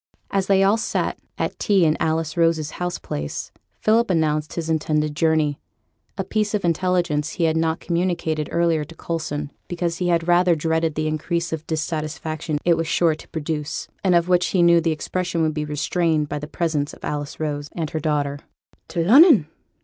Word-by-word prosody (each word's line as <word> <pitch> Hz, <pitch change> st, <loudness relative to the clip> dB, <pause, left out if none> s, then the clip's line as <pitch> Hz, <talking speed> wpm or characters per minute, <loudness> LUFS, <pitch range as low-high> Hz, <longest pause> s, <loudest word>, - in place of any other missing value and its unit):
As 195 Hz, -1 st, 0 dB
they 195 Hz, -1 st, +4 dB
all 200 Hz, +3 st, +4 dB
sat 225 Hz, -, -2 dB, 0.2 s
at -, -, -3 dB
tea 195 Hz, -4 st, +3 dB
in 155 Hz, 0 st, +3 dB
Alice 160 Hz, -1 st, -1 dB
Rose's 165 Hz, -3 st, +1 dB
house 180 Hz, 0 st, -3 dB
place, 75 Hz, 0 st, -5 dB, 0.3 s
Philip 225 Hz, +1 st, +3 dB
announced 155 Hz, -3 st, 0 dB
his 165 Hz, -2 st, -3 dB
intended 150 Hz, -1 st, 0 dB
journey; 155 Hz, -2 st, +1 dB, 0.6 s
a -, -, -1 dB
piece 215 Hz, -1 st, -1 dB
of 200 Hz, -, -1 dB
intelligence 170 Hz, -3 st, 0 dB
he 175 Hz, -, -2 dB
had 160 Hz, -1 st, +2 dB
not 160 Hz, 0 st, 0 dB
communicated 170 Hz, -3 st, -1 dB
earlier 170 Hz, -2 st, +2 dB
to 165 Hz, +3 st, -12 dB
Coulson 155 Hz, -3 st, -4 dB, 0.2 s
because 170 Hz, -1 st, -2 dB
he 180 Hz, -, 0 dB
had 170 Hz, -1 st, +1 dB
rather 175 Hz, 0 st, +4 dB
dreaded 160 Hz, 0 st, 0 dB
the 155 Hz, -, -1 dB
increase 170 Hz, +2 st, -2 dB
of 160 Hz, 0 st, -5 dB
dissatisfaction 155 Hz, -1 st, -3 dB
it 170 Hz, -1 st, +4 dB
was 165 Hz, 0 st, -1 dB
sure 165 Hz, -1 st, +3 dB
to 155 Hz, -, -11 dB
produce, 150 Hz, -1 st, -4 dB, 0.2 s
and 185 Hz, -2 st, +4 dB
of 170 Hz, 0 st, +3 dB
which 180 Hz, -1 st, +3 dB
he 180 Hz, -3 st, +2 dB
knew 170 Hz, 0 st, +6 dB
the 165 Hz, -, +1 dB
expression 170 Hz, +1 st, -2 dB
would 155 Hz, -1 st, +1 dB
be 150 Hz, 0 st, -2 dB
restrained 155 Hz, +1 st, 0 dB
by 145 Hz, -, -3 dB
the 150 Hz, -, -7 dB
presence 155 Hz, -3 st, -1 dB
of -, -, -10 dB
Alice 145 Hz, -1 st, -4 dB
Rose 145 Hz, -2 st, -3 dB
and 160 Hz, -3 st, -3 dB
her 160 Hz, -, -2 dB
daughter. 145 Hz, -2 st, -1 dB, 0.5 s
'To 170 Hz, -, -2 dB
Lunnon!' 255 Hz, -, +7 dB
160 Hz, 190 wpm, -22 LUFS, 155-175 Hz, 0.6 s, Lunnon